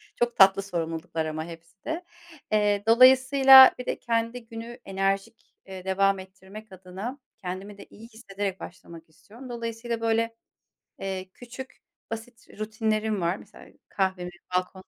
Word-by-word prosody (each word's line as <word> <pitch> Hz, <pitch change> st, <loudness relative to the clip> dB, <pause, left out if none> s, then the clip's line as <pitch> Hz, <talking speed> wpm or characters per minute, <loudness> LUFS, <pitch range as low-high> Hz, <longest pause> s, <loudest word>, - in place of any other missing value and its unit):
çok 240 Hz, 0 st, 0 dB
tatlı 195 Hz, 0 st, +6 dB
sorumluluklar 165 Hz, -3 st, -3 dB
ama 155 Hz, 0 st, -4 dB
hepsi 170 Hz, +3 st, -13 dB
de. 325 Hz, +3 st, -3 dB, 0.5 s
Eee, 205 Hz, -1 st, +2 dB
dolayısıyla 265 Hz, +2 st, +8 dB
bir 250 Hz, -, -7 dB
de -, -, -3 dB
kendi 230 Hz, +1 st, -2 dB
günü 230 Hz, +2 st, -9 dB
enerjik, 195 Hz, +3 st, -2 dB
eee, 190 Hz, -1 st, -9 dB
devam 195 Hz, +1 st, +2 dB
ettirmek 190 Hz, +3 st, -12 dB
adına 190 Hz, +7 st, -7 dB, 0.2 s
kendimi 195 Hz, +1 st, -7 dB
de -, -, -11 dB
iyi 225 Hz, +2 st, -13 dB
hissederek 200 Hz, -4 st, -5 dB
başlamak 165 Hz, -2 st, -11 dB
istiyorum. 235 Hz, +10 st, -14 dB
Dolayısıyla, 230 Hz, 0 st, -4 dB
böyle, 230 Hz, 0 st, 0 dB, 0.6 s
eee, 190 Hz, -1 st, -5 dB
küçük, 250 Hz, +2 st, -11 dB, 0.3 s
basit 230 Hz, +2 st, -8 dB
rutinlerim 215 Hz, -1 st, -1 dB
var. 170 Hz, +2 st, +1 dB
Mesela -, -, -16 dB, 0.2 s
kahvemi 190 Hz, -2 st, -1 dB, 0.3 s
balkonda 185 Hz, +1 st, -2 dB
205 Hz, 135 wpm, -26 LUFS, 190-230 Hz, 0.6 s, dolayısıyla